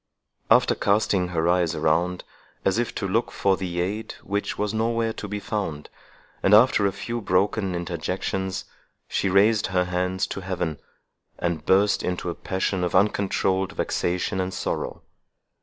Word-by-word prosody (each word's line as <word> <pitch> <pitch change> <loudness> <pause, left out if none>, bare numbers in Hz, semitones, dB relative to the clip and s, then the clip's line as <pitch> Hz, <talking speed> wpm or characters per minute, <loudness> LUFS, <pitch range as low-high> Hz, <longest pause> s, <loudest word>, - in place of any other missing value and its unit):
After - - +5
casting 100 -3 +1
her 85 -2 0
eyes 85 -2 +2
around, 85 +4 +1 0.4
as 95 +4 +2
if 120 - -2
to 100 - -2
look 115 +5 +1
for 95 -1 +1
the 90 -2 -4
aid 105 +5 -3
which 100 +1 -2
was 105 0 -1
nowhere 115 0 0
to 105 - -6
be 105 +1 -4
found, 95 -9 -4 0.5
and 105 - +6
after 110 -3 +5
a - - 0
few 115 +4 -4
broken 95 0 +1
interjections, 90 +2 -3 0.4
she 95 - 0
raised 105 +3 +4
her 90 -1 +1
hands 90 +1 -1
to - - -5
heaven, 90 -4 -3 0.6
and 85 -3 -2
burst 100 +2 +4
into 90 -1 -2
a - - -4
passion 95 0 -2
of 90 - -1
uncontrolled 95 -1 +1
vexation 90 +2 -1
and 95 +1 -3
sorrow. - - -3
95 Hz, 155 wpm, -25 LUFS, 90-105 Hz, 0.6 s, and